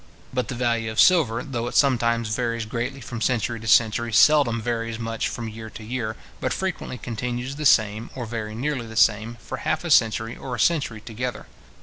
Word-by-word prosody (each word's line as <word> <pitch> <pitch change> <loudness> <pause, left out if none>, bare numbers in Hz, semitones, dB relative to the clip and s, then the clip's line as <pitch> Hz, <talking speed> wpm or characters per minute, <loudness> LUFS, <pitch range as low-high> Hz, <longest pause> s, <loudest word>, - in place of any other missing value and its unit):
But 125 -1 -1
the 130 - -4
value 115 -2 0
of 110 - -3
silver, 125 -10 +4
though 120 -4 -3
it - - -6
sometimes 115 -5 +2
varies 115 -2 -1
greatly 125 +5 -4
from 120 -1 -6
century 115 -1 0
to 110 - -8
century, 115 +2 +3
seldom 130 -1 +5
varies 115 0 -2
much 115 -1 -2
from 115 -1 -5
year 110 0 -8
to 110 - -10
year, 110 -1 -3 0.2
but - - -1
frequently 190 -8 -3
continues 120 +3 -4
the 150 0 +2
same, 110 0 +3
or 125 -2 -4
very 110 -1 -5
nearly 130 -1 -2
the 110 - -10
same, 110 +1 +3
for - - -6
half - - -1
a - - -3
century 110 +1 +3
or 125 -2 -5
a - - -7
century 140 -10 +1
together. 120 +1 -5
115 Hz, 200 wpm, -24 LUFS, 110-125 Hz, 0.2 s, seldom